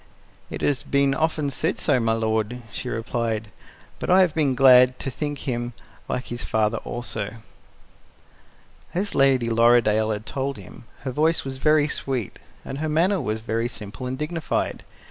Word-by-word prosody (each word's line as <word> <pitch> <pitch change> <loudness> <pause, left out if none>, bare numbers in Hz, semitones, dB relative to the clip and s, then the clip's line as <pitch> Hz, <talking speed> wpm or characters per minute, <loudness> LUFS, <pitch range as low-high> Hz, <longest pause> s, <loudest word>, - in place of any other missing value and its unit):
"It - - -6
has 140 -4 +1
been 140 -1 +2
often 155 -1 0
said - - 0
so, 130 - +2
my 115 -1 +1
lord," 110 +2 -1
she 125 - -5
replied, 115 -2 -2 0.5
"but - - -4
I 185 +1 +6
have 180 -5 +3
been 145 -5 +1
glad 125 -1 +7
to 135 - -4
think 145 +3 -4
him 120 -1 -2 0.4
like 125 - -3
his 120 0 -4
father 110 +1 +1
also." 110 -3 -3 1.6
As 200 +3 -1
Lady 135 -3 +3
Lorridaile 115 -2 +4
had 105 0 -3
told 135 0 -3
him, 100 +3 -12 0.2
her 130 - -3
voice 155 +4 +1
was 130 -1 -5
very 150 0 +4
sweet, 130 -7 -3 0.3
and 135 - -5
her 155 0 -1
manner 175 +5 +2
was 110 -3 -2
very 115 +1 -1
simple 115 +2 -7
and 130 +1 -3
dignified. 155 +2 -2
125 Hz, 165 wpm, -24 LUFS, 115-145 Hz, 1.6 s, glad